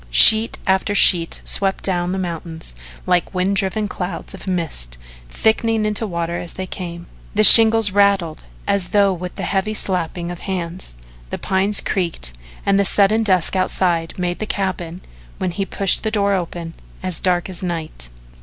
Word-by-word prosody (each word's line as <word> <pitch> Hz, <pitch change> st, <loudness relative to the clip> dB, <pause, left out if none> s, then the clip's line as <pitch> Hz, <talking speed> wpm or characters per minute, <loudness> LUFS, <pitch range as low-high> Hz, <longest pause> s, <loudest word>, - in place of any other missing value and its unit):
Sheet 220 Hz, -, +6 dB
after 190 Hz, +2 st, 0 dB
sheet 170 Hz, -4 st, +4 dB
swept 195 Hz, -1 st, +1 dB
down 180 Hz, -2 st, -1 dB
the 190 Hz, -, -3 dB
mountains 165 Hz, -, -5 dB, 0.3 s
like 180 Hz, +1 st, 0 dB
wind 185 Hz, +2 st, 0 dB
driven 200 Hz, +2 st, -1 dB
clouds 180 Hz, -1 st, -6 dB
of 195 Hz, -, -11 dB
mist 155 Hz, -, -2 dB, 0.3 s
thickening 220 Hz, -, 0 dB
into 215 Hz, +1 st, -1 dB
water 170 Hz, -1 st, -3 dB
as 175 Hz, -, -8 dB
they 190 Hz, -, -5 dB
came. 170 Hz, -2 st, -7 dB, 0.3 s
The 215 Hz, -, +3 dB
shingles 225 Hz, -1 st, +9 dB
rattled 195 Hz, -5 st, +1 dB, 0.2 s
as 200 Hz, -3 st, -1 dB
though 200 Hz, -2 st, +3 dB
with 180 Hz, 0 st, -7 dB
the -, -, -6 dB
heavy 200 Hz, +2 st, -1 dB
slapping 175 Hz, -3 st, -1 dB
of 175 Hz, -, -8 dB
hands, 180 Hz, -, -5 dB, 0.3 s
the -, -, -4 dB
pines 195 Hz, +2 st, 0 dB
creaked 170 Hz, -, -3 dB, 0.3 s
and 200 Hz, 0 st, +2 dB
the -, -, +3 dB
sudden 205 Hz, +3 st, +3 dB
dusk 185 Hz, -5 st, +1 dB
outside 175 Hz, -3 st, -1 dB
made 180 Hz, -1 st, -3 dB
the 215 Hz, -, -4 dB
cabin, 185 Hz, -4 st, -4 dB, 0.4 s
when 185 Hz, -, -2 dB
he 195 Hz, +3 st, -4 dB
pushed 195 Hz, -1 st, 0 dB
the 220 Hz, -, -2 dB
door 200 Hz, -2 st, 0 dB
open, 170 Hz, -2 st, -4 dB, 0.3 s
as 185 Hz, -3 st, -2 dB
dark 180 Hz, -2 st, 0 dB
as 185 Hz, -2 st, -6 dB
night. 160 Hz, -, -5 dB
185 Hz, 165 wpm, -19 LUFS, 170-200 Hz, 0.4 s, shingles